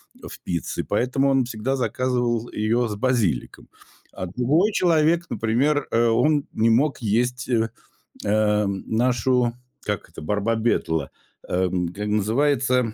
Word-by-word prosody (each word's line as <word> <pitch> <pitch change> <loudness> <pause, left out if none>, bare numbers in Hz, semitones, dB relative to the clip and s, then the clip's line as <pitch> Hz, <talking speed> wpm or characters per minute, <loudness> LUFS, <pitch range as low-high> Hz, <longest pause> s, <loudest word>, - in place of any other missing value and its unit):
в - - -11
пицце, 85 -2 -3
поэтому 135 +2 +1
он 135 -2 +3
всегда 120 +2 -2
заказывал 120 -1 -1
ее 115 +3 0
с 105 - -4
базиликом. 105 - -1 0.4
А - - -5
другой 135 - +1
человек, 170 -2 +2
например, 135 +6 +1
э, 115 +1 +3
он 145 +6 +2
не 115 +1 +2
мог 135 +5 +2
есть, 125 +3 0
э, 115 -2 +1 0.5
э, 105 0 +2
нашу, 120 +4 +1 0.3
как - - -3
это, - - -10
барбабетла, 105 - 0 0.4
эм, 90 -1 0
к 90 - -14
э, 105 - -2
называется 125 +3 +1
120 Hz, 130 wpm, -23 LUFS, 105-130 Hz, 0.5 s, он